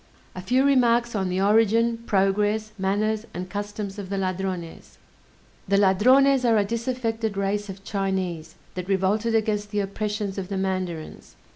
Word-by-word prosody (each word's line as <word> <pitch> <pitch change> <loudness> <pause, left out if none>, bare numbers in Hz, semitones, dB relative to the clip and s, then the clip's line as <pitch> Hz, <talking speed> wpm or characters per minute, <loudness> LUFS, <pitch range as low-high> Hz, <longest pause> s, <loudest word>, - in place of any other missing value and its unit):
A 185 - -7
few 255 +8 +2
Remarks 240 -3 +3
on 190 -3 -1
the 180 +1 -1
Origin, 225 +3 +3
Progress, 205 +2 +1
Manners, 210 +3 0
and 180 +1 -5
Customs 205 0 -5
of 195 -2 -7
the 200 - -2
Ladrones 185 -2 -4 0.7
The 200 +1 +3
Ladrones 255 +8 +4
are 230 -2 +4
a 205 - +2
disaffected 230 -2 -2
race 200 +1 -1
of 195 0 -9
Chinese, 190 -5 -3 0.2
that 180 +1 -6
revolted 205 +4 +1
against 210 -1 0
the 205 -1 -1
oppressions 205 0 -3
of 185 - -5
the 195 0 -3
mandarins. 185 -4 -4
205 Hz, 150 wpm, -24 LUFS, 190-225 Hz, 0.7 s, Ladrones